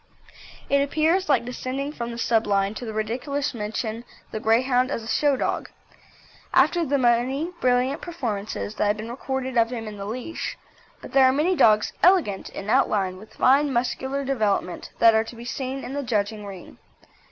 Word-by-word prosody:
It 280 0 +3
appears 315 +5 +1
like 250 -5 +3
descending 255 +3 -4
from 235 -4 -5
the 235 - -6
sublime 205 -4 +1
to 245 - -7
the - - -3
ridiculous 245 +7 -2
to 240 - -10
mention 220 +2 -3 0.3
the 220 - -3
Greyhound 250 +3 +2
as 230 -5 -3
a - - -9
show 285 +3 +2
dog, - - -2 0.9
after 345 -1 +4
the 285 -2 +1
many 260 +6 +1
brilliant 255 +4 +2
performances 220 - -4
that 210 - 0
have 205 +1 +1
been 220 +2 -6
recorded 260 0 -2
of 230 0 +3
him 230 -3 -5
in 210 -1 -7
the 200 - -6
leash, 250 +9 -5 0.5
but - - -9
there 270 -1 +6
are 260 - +6
many 310 +7 +1
dogs 215 -8 +4
elegant 345 - +3
in 195 - -8
outline 210 -6 +2
with 215 +3 -14
fine 280 +3 +4
muscular 265 +2 -1
development 215 -9 -1
that 230 -1 +6
are 220 0 +3
to 230 - -10
be 235 +1 -10
seen 265 +2 -4
in 260 - -6
the 285 - -2
judging 210 -4 -2
ring. 190 -3 -11
245 Hz, 185 wpm, -24 LUFS, 220-275 Hz, 0.9 s, there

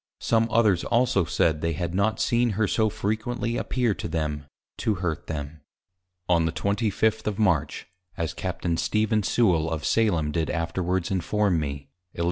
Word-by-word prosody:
Some 115 0 +2
others 110 -6 +3
also 120 -6 +2
said 80 -2 +1
they 85 0 0
had 85 +1 -3
not 100 +3 +1
seen 120 -1 +2
her 110 -2 +2
so 110 +1 +2
frequently 115 +4 -2
appear 120 -4 0
to - - -5
them, 75 -3 -3 0.3
to 110 - +1
hurt 90 -3 -3
them. 75 0 -5 0.7
On 85 -2 +3
the 80 - 0
25th. 110 +3 0
of 105 -2 -1
March 95 -9 +1 0.3
(as 85 -3 -2
Capt. - - -4
Stephen 110 0 +1
Sewal 90 -7 +2
of 80 -2 -3
Salem 85 -10 +2
did 80 0 -1
afterwards 85 +3 -1
inform 95 0 +1
me) 70 -1 -5 0.2
_Eliz. - - -9
95 Hz, 160 wpm, -25 LUFS, 80-110 Hz, 0.7 s, others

